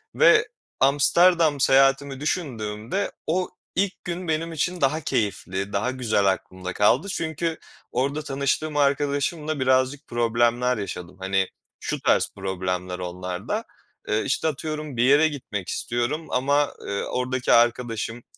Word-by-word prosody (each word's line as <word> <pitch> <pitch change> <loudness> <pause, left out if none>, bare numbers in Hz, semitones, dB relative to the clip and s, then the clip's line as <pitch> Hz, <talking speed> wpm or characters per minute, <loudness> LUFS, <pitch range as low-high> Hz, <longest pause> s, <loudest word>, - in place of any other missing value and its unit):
ve - - +6 0.3
Amsterdam 155 +3 +4
seyahatimi 135 +1 +3
düşündüğümde 125 - -2 0.2
o 180 +3 0 0.3
ilk 195 0 -1
gün 175 0 -4
benim 165 +1 -1
için 175 +2 -2
daha 150 +4 +2
keyifli, 100 -6 -2
daha 105 +6 0
güzel 115 -6 0
aklımda 95 -1 -6
kaldı. 120 - +3
Çünkü 160 0 -2 0.3
orada 140 +5 0
tanıştığım 140 +3 -1
arkadaşımla 145 +2 0
birazcık 130 +3 +1
problemler 120 +1 +1
yaşadım. 90 -3 -6
Hani, 95 0 +1 0.3
şu - - -3
tarz - - +2
problemler 90 -1 -3
onlar 90 0 -5
da: - - -1 0.4
Eee, 105 +1 +1
işte, 140 - 0
atıyorum, 155 -2 -4
bir 120 - +3
yere 145 +5 +6
gitmek 125 - -5
istiyorum 125 +7 -2
ama, 140 +3 +2
ııı, 100 0 -3
oradaki 125 0 -1
arkadaşım 120 -1 +1
130 Hz, 125 wpm, -24 LUFS, 105-150 Hz, 0.4 s, ve